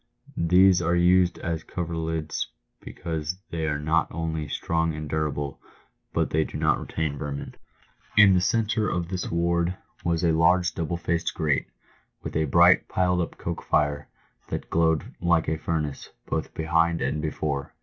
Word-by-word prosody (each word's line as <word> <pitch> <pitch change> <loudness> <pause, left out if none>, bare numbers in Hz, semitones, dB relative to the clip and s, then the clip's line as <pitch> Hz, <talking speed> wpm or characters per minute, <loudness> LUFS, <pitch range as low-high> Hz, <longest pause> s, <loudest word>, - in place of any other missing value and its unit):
These 90 +1 +6
are 85 +1 +1
used 90 +1 +4
as 80 -1 -3
coverlids 80 -2 -3 0.3
because 80 0 -4
they 80 -1 -2
are 75 -1 0
not 80 +2 +1
only 80 -1 -3
strong 80 +2 -1
and 75 0 -5
durable, 75 -1 -2 0.5
but - - 0
they 80 +1 +2
do - - -6
not - - +2
retain 75 -3 -3
vermin. 70 -1 -5 0.6
In 105 -2 +8
the 90 - +3
centre 110 +1 +1
of 85 -1 -2
this 90 -1 -3
ward 85 +1 +1 0.3
was 85 -1 0
a 85 - +4
large 85 +2 +3
double 85 +1 -2
faced 85 0 -1
grate, 75 -2 0 0.6
with - - -6
a 80 0 +2
bright 85 +5 +5
piled 90 -1 +1
up 85 - -5
coke - - -4
fire, 75 -1 0 0.4
that - - -5
glowed 80 -1 +2 0.2
like 85 -2 +2
a 80 0 -1
furnace 75 -3 -3 0.2
both - - -3
behind 85 +1 +1
and 75 - -1
before. 75 -2 -3
80 Hz, 160 wpm, -26 LUFS, 75-85 Hz, 0.6 s, In